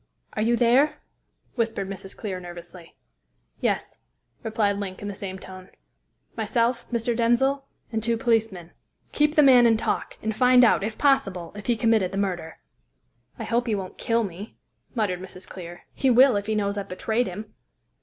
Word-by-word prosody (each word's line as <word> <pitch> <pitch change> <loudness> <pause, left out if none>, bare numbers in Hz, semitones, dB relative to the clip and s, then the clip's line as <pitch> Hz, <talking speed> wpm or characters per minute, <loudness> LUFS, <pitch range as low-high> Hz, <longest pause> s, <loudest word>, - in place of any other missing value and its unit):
"Are 215 - -2
you 235 +2 +2
there?" 250 +5 +4 0.6
whispered 225 -5 -1
Mrs. 195 0 -8
Clear 195 -4 -4
nervously. 175 -1 -11 0.6
"Yes," - - -1 0.4
replied 215 -3 0
Link 190 -2 -5
in - - -4
the 205 - -4
same 190 -1 -6
tone. 185 0 -11 0.7
"Myself, 230 +2 0
Mr. 235 0 0
Denzil, 245 +4 +2 0.3
and 220 -1 -1
two 230 +1 0
policemen. 225 -8 0 0.4
Keep 300 +1 +2
the 300 - +6
man 250 -3 +7
in 225 -1 +4
talk, - - -2
and 220 -1 -1
find 250 +1 +6
out, 220 - +3
if 215 +1 -3
possible, 195 -12 +1
if 205 0 -9
he 240 - +3
committed 220 -4 +2
the 195 - -4
murder." 180 -5 -2 0.8
"I - - -5
hope 240 +2 0
he 220 - +1
won't 190 -2 -6
kill 230 0 +1
me," 195 +2 -8 0.4
muttered 195 -6 -1
Mrs. 185 0 -10
Clear. 175 -1 -9
"He 270 - +1
will, 255 +1 +6
if 205 0 -2
he 220 - 0
knows 200 -1 -1
I've 200 - -7
betrayed 220 +6 -1
him." 210 +4 -7
220 Hz, 175 wpm, -25 LUFS, 190-235 Hz, 0.8 s, man